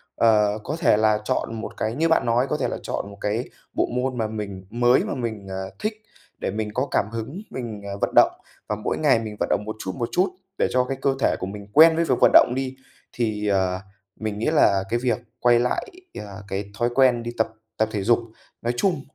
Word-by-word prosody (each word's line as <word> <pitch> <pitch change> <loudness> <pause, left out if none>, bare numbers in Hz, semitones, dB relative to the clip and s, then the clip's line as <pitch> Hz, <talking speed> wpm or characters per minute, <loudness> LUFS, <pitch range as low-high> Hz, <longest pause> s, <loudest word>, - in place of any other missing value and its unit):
Ờ, 105 -2 +3
có 150 - -3
thể 145 - +4
là 110 0 +3
chọn 115 +1 -2
một - - -7
cái 110 +2 -1
như 165 +4 +1
bạn 160 - +3
nói, 120 +3 +2
có 150 - 0
thể 135 - 0
là - - -3
chọn 100 - -3
một 100 - -12
cái 110 +4 -1 0.2
bộ - - +1
môn 125 +1 -1
mà 110 -2 0
mình 100 -3 -6
mới 120 +3 +3
mà - - -3
mình, 110 -6 -4
à, 95 0 -4 0.2
thích 215 +1 -1 0.5
để - - -2
mình 105 +1 -3
có 130 +5 0
cảm - - +2
hứng, 115 - -5
mình, 115 -5 -5
ờ, 100 0 -5
vận - - +1
động - - +7 0.4
và 105 - 0
mỗi 105 - -2
ngày 145 -6 +4
mình 110 -2 -6
vận - - 0
động 105 - +1
một 110 - -4
chút, 95 - -3
một 120 +3 -2
chút 185 +2 +2 0.3
để - - +2
cho 125 0 +3
cái 135 +1 -4
cơ 135 0 +2
thể - - +2
của - - -3
mình 100 +1 -8
quen 160 +2 +8
với 165 +1 +1
việc - - +2
vận - - +7
động 120 - +7
đi, 130 0 -3 0.4
thì, 110 -3 -1
ờ, 95 -2 +1 0.4
mình 110 -1 -3
nghĩ 115 - -1
là 100 -11 +4
cái 120 - +1
việc 120 -4 +2 0.2
quay 120 -1 +5
lại, 125 +1 0 0.3
ờ, 100 -1 -8
cái 100 +1 -4
thói 120 0 +2
quen 125 -3 +4
đi 120 - -4
tập 110 - +2 0.3
tập 110 0 +1
thể 105 -3 -2
dục 120 +4 +4 0.4
nói 120 +1 -1
chung, 175 -1 +1
115 Hz, 240 wpm, -24 LUFS, 105-125 Hz, 0.5 s, quen